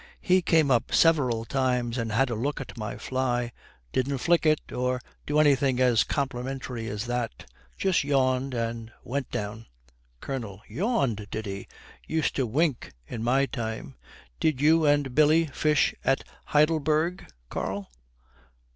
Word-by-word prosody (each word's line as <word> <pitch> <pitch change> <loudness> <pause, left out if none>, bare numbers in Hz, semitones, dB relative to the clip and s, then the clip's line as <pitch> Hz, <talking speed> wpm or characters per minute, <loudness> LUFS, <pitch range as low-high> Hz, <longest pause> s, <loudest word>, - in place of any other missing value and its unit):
'He 185 0 +3
came 160 -4 +3
up 120 -3 +2
several 130 -9 +3
times 125 -2 0
and 115 -1 -2
had 125 +3 +2
a - - 0
look 135 +6 -2
at 135 - -8
my 105 -3 -5
fly. 125 -2 -1 0.4
Didn't 135 +2 0
flick 165 +4 +2
it, 155 -1 +1
or 125 0 -1 0.3
do 150 - +1
anything 140 -4 +4
as 125 -3 +4
complimentary 130 -3 -3
as 105 +1 -4
that. 120 -1 -3 0.3
Just 190 -5 +2
yawned 130 -2 +1
and 115 -1 -3
went 135 +1 -3
down.' 105 +2 -5 0.5
COLONEL. 110 - -5
'Yawned, 135 - -1
did 110 +1 -4
he? 100 -1 -6 0.4
Used 160 -1 0
to 130 -3 +1
wink 145 +2 0
in 110 - -6
my 130 +4 +3
time. 110 - -5 0.5
Did 155 -5 +1
you 155 +2 +4
and 145 -3 +2
Billy 155 +3 +5
fish 150 0 +2
at 135 - +2 0.2
Heidelberg, 155 +3 +2 0.2
Karl?' 95 -3 -4
130 Hz, 145 wpm, -27 LUFS, 115-150 Hz, 0.5 s, Billy